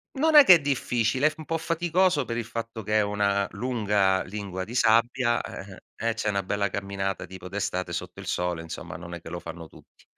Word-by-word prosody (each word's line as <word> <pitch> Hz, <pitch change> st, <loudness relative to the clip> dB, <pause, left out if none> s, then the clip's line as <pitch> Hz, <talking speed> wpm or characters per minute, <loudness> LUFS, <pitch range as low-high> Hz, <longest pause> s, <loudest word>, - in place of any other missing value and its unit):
Non 310 Hz, +3 st, +2 dB
è 295 Hz, -, +11 dB
che 190 Hz, -9 st, +9 dB
è -, -, +2 dB
difficile, 130 Hz, -1 st, +1 dB
è -, -, +4 dB
f 155 Hz, -, -12 dB
un 155 Hz, -, -9 dB
po' 165 Hz, +1 st, -1 dB
faticoso 170 Hz, -2 st, +1 dB
per 115 Hz, -, -4 dB
il 120 Hz, -, -2 dB
fatto 115 Hz, 0 st, -6 dB
che 105 Hz, +2 st, +1 dB
è -, -, +4 dB
una 100 Hz, -1 st, +1 dB
lunga 105 Hz, -4 st, +1 dB
lingua 95 Hz, -2 st, -5 dB
di 115 Hz, -, -8 dB
sabbia 120 Hz, +1 st, +3 dB
e 95 Hz, 0 st, -9 dB, 0.2 s
e 115 Hz, -, +1 dB
eh 115 Hz, -, 0 dB
c'è 110 Hz, -, -3 dB
una 100 Hz, -1 st, 0 dB
bella 100 Hz, +1 st, -1 dB
camminata 95 Hz, -1 st, -3 dB
tipo 95 Hz, -1 st, -9 dB
d'estate 90 Hz, -2 st, -3 dB
sotto 85 Hz, -, -5 dB
il -, -, -10 dB
sole, 90 Hz, -1 st, -1 dB
insomma, 80 Hz, -, -7 dB
non 85 Hz, 0 st, -9 dB
è 85 Hz, -, -7 dB
che -, -, -10 dB
lo 85 Hz, +1 st, -5 dB
fanno 85 Hz, -1 st, -8 dB
tutti. -, -, -20 dB
105 Hz, 230 wpm, -26 LUFS, 95-125 Hz, 0.2 s, è